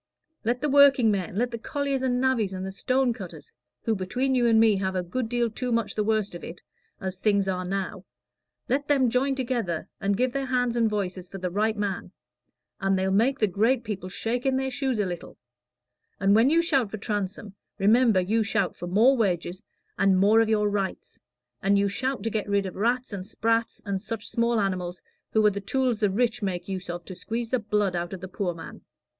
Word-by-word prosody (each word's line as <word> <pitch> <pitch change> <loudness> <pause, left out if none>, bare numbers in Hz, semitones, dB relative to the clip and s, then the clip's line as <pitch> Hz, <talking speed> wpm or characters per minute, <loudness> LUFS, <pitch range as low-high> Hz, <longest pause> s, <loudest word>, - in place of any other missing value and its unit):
Let 240 +3 0
the 300 - +1
workingmen 250 -10 +4
let 240 +3 0
the 235 - -5
colliers 280 +2 -2
and 250 -1 +1
navvies 245 -7 +1
and 190 +1 -5
stone 255 +4 +1
cutters, 350 - -10 0.3
who 225 - +1
between 250 +8 -1
you 245 -2 +3
and 225 -1 +5
me 220 -3 +5
have 190 0 -2
a 180 - 0
good 225 +7 -3
deal 240 0 +1
too 245 +3 -4
much 230 -2 0
the 215 - 0
worst 215 -2 0
of 175 - -8
it, 175 - -9 0.4
as 190 -1 -5
things 200 -1 +2
are 185 -1 -1
now 190 +1 -3 0.6
let 285 +3 0
them 265 -5 +3
join 270 +3 +1
together 235 -11 -2
and 200 0 0
give 250 +1 +1
their 275 -1 -2
hands 245 -2 +1
and 230 -2 +3
voices 190 -3 -3
for 195 - -7
the 180 -1 -3
right 215 +3 0
man, 195 -3 -3 0.7
and 195 -1 +1
they'll 190 0 0
make 235 +8 +3
the 220 - +3
great 225 +6 +1
people 200 -4 -5
shake 230 +6 -2
in 265 -1 +1
their 265 0 -1
shoes 260 -2 -1
a 205 - +1
little; 175 -2 -6 0.8
and 195 0 +3
when 225 +5 +5
you 335 +2 +4
shout 270 -10 +2
for 215 - -5
Transome, 205 -1 -4 0.2
remember 215 +1 +4
you 210 +5 +1
shout 200 -3 0
for 175 - -6
more 225 +9 +5
wages, 185 -4 -1 0.4
and 195 -1 +4
more 210 +4 +5
of 225 - +1
your 210 -1 +2
rights, 200 -2 -3 0.4
and 200 +1 +3
you 200 0 +3
shout 260 +6 -2
to 225 - -1
get 210 -1 -2
rid 200 -1 +1
of 185 - -6
rats 240 +3 0
and 190 -1 -5
sprats 225 +1 0
and 195 -2 -2
such 225 0 -5
small 235 -1 +1
animals, 185 -3 -2 0.3
who 220 -1 +4
are 210 - +6
the 200 0 -5
tools 250 +2 0
the 210 - +2
rich 230 +4 0
make 185 -3 -3
use 185 -2 -5
of 175 0 -5
to 185 - -7
squeeze 230 +5 -4
the 255 - +2
blood 210 -3 0
out 175 +1 -3
of 190 - -6
the 185 - -6
poor 180 -2 -3
man." 165 - -10
215 Hz, 215 wpm, -26 LUFS, 190-245 Hz, 0.8 s, are